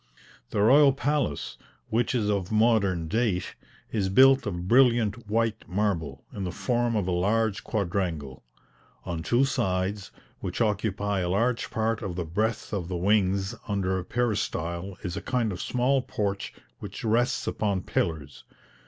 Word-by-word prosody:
The 100 - +1
royal 140 +4 +6
palace, 140 - -1 0.3
which 120 +3 +1
is 110 -4 +1
of 100 -3 -1
modern 105 -7 +2
date, 105 -1 0 0.4
is 100 -4 0
built 135 +4 +6
of 90 -2 -4
brilliant 120 -2 +3
white 115 -4 -1
marble, 85 -9 -1
in 100 - -4
the 90 - -2
form 120 +2 0
of 100 -4 0
a - - 0
large 105 +4 +1
quadrangle. 90 - -2 0.6
On 85 -2 -3
two 120 +10 +2
sides, 100 -6 -1 0.3
which - - -4
occupy 105 -2 0
a 90 -1 -1
large 115 +6 0
part 110 0 -1
of 95 -4 -4
the 90 -2 -3
breadth 110 +8 -2
of 95 -5 -2
the 90 -1 -3
wings, 95 0 +2
under 95 -3 0
a - - -5
peristyle, 95 -5 -2
is 90 -2 -3
a - - -4
kind 120 -4 0
of 90 - -5
small 130 +2 +1
porch 100 -5 -3 0.3
which - - -8
rests 115 +2 +1
upon 100 -3 -1
pillars. 75 -4 -2
105 Hz, 155 wpm, -27 LUFS, 90-115 Hz, 0.6 s, royal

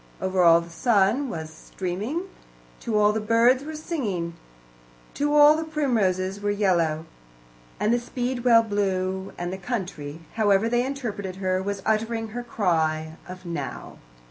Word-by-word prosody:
Over 185 0 0
all 170 -1 +7
the 170 0 -11
sun 230 +7 +2
was 160 -5 -5
streaming, 200 - -4 0.6
to 225 -3 -1
all 210 0 +4
the 220 - -1
birds 230 +4 +4
were 310 +1 -6
singing, 215 - -3 0.8
to 295 +1 0
all 295 +1 +8
the 320 - -2
primroses 205 - 0
were 205 - -1
yellow, 170 -6 +1 0.7
and 215 - +2
the 240 - +2
speedwell 245 -1 +2
blue, 190 -2 -1
and 175 +1 -3
the 190 - -6
country, 180 - -5 0.2
however 205 0 +3
they 240 +1 +2
interpreted 220 -8 -4
her, 185 -1 -1
was 200 0 -4
uttering 225 +1 0
her 240 +3 -5
cry 160 -8 -1
of 185 0 -9
"now." 170 -1 -6
205 Hz, 145 wpm, -25 LUFS, 185-240 Hz, 0.8 s, all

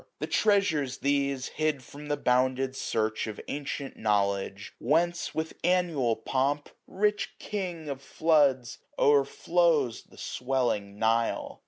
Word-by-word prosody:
The - - -3
treasures 160 -11 +2
these, 140 -1 0
hid 155 -4 -1
from 145 +4 -11
the 145 0 0
bounded 130 +1 +1
search 110 -4 -1
Of 110 - -6
ancient 140 -1 -4
knowledge; 100 -1 0
whence, 170 +6 +1
with 160 0 -2
annual 170 -10 +2
pomp. 135 +5 -1
So - - -25
SUMMER* 185 - -13
Rich 210 0 +1
king 180 -6 -4
of 140 -2 -5
floods! 140 -4 +2 0.2
overflows 145 -1 +2
the - - -18
swelling 120 -6 -1
Nile. 115 +1 0
140 Hz, 130 wpm, -28 LUFS, 125-160 Hz, 0.2 s, treasures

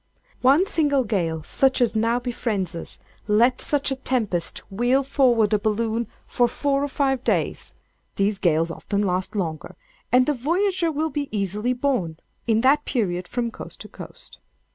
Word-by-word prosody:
One 275 +8 +5
single 290 -7 +1
gale 170 -8 -1
such 265 - +2
as 240 -2 +2
now 230 +2 +2
befriends 230 -7 -2
us—let 215 +7 -1
such 285 -1 +1
a - - 0
tempest 220 -10 -1
whirl 245 +7 +2
forward 245 -6 +3
a 210 - +3
balloon 220 +2 -1 0.2
for 245 - +2
four 275 +3 0
or - - 0
five 270 -2 0
days - - -1 0.4
(these 200 0 0
gales 165 -2 +2
often 200 +4 -2
last 185 +1 -1
longer) 165 -6 -3 0.4
and 255 +1 +5
the 295 - +1
voyager 340 +6 0
will 310 +1 -1
be 290 -2 -3
easily 210 +4 -1
borne, 245 - -1 0.3
in 225 -1 +3
that 285 +4 +4
period, 180 -7 -1
from 240 -1 -2
coast - - -10
to - - -8
coast. - - -12
240 Hz, 160 wpm, -23 LUFS, 200-270 Hz, 0.4 s, One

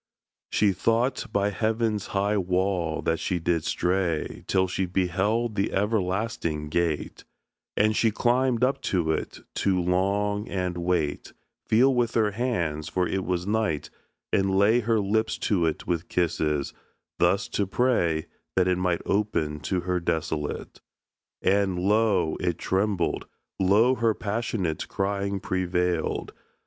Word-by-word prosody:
She 105 -1 +3
thought 115 +7 0
by 100 0 +1
heaven's 110 -1 0
high 100 +1 0
wall 90 -3 0
that 80 0 0
she 90 - -1
did 85 -1 0
stray 90 -3 -1
Till 95 -1 +2
she 95 +1 -1
beheld 95 +6 0
the 100 -1 0
everlasting 95 -6 -1
gate: 80 -2 -1 0.5
And 110 +1 +3
she 115 - +3
climbed 120 +2 +1
up 135 +1 +2
to 85 -4 +1
it - - -3 0.2
to 95 -2 +2
long, 100 +4 0
and 90 -2 -2
wait, 85 -4 -1 0.3
Feel 130 +5 +4
with 120 -2 0
her 110 -2 +3
hands 85 -10 -2
(for 90 -1 0
it 95 -1 -1
was 90 -1 -1
night), 105 -8 -1 0.4
and 95 0 +2
lay 105 +5 +5
Her 115 -1 +1
lips 110 +2 0
to 90 -6 +1
it 80 - -3
with 85 -1 -2
kisses; 75 -4 0 0.5
thus - - +2
to 100 - -1
pray 90 -9 +1 0.3
That 95 -1 +3
it 90 -1 +1
might 90 -2 0
open 85 -8 0
to 90 -2 +1
her 90 +1 -1
desolate. 80 -3 -3 0.6
And 95 -1 +2
lo! 95 -3 +2
it 90 -3 -1
trembled, 95 -2 0 0.3
lo! 105 +7 +4
her 115 -4 +1
passionate 100 -6 -2
Crying 100 0 -1
prevailed. 90 -3 -1
95 Hz, 135 wpm, -26 LUFS, 85-105 Hz, 0.6 s, lay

